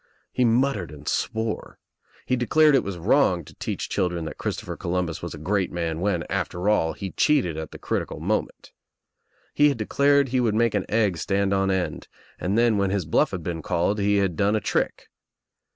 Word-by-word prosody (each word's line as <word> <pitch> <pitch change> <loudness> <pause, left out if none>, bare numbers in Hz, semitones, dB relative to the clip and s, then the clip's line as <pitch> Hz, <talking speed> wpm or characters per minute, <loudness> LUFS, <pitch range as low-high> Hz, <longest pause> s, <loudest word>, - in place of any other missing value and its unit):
He 125 - +1
mut 125 +2 +2
tered 85 -4 -6
and 75 -1 -12
swore. 110 0 -2 0.5
He 130 - +1
declared 150 +5 +4
it 135 - +4
was 100 -2 -5
wrong 90 - +2
to - - -14
teach - - -4
children 90 -4 -1
that - - -7
Christopher - - -4
Columbus 85 -2 -2
was 85 -2 -5
a - - -9
great 95 +5 -1
man 85 -2 -2
I - - -6
when, 95 -3 0
after 90 +4 -2
all, 80 -6 +2
he 95 -2 -6
cheated 135 - +2
at 80 0 -5
the - - -10
critical - - -3
moment. - - -2 0.8
He 145 - +4
I - - +8
had 140 - -2
declared 140 +5 +2
he 130 +1 +1
would 110 -3 +1
make 115 0 +2
an - - -2
egg 105 -5 +1
stand 100 0 0
on 95 0 +1
end 95 -2 -2 0.3
and 95 +4 -1
then 115 -3 +3
when 100 -1 +1
his 95 -3 -1
bluff 80 - +2
had 95 -4 -5
been 85 -1 -4
called 90 +7 0
he 100 0 +2
had 95 -4 +1
done 100 +5 +2
a - - +2
trick. - - -2
100 Hz, 210 wpm, -24 LUFS, 85-115 Hz, 0.8 s, I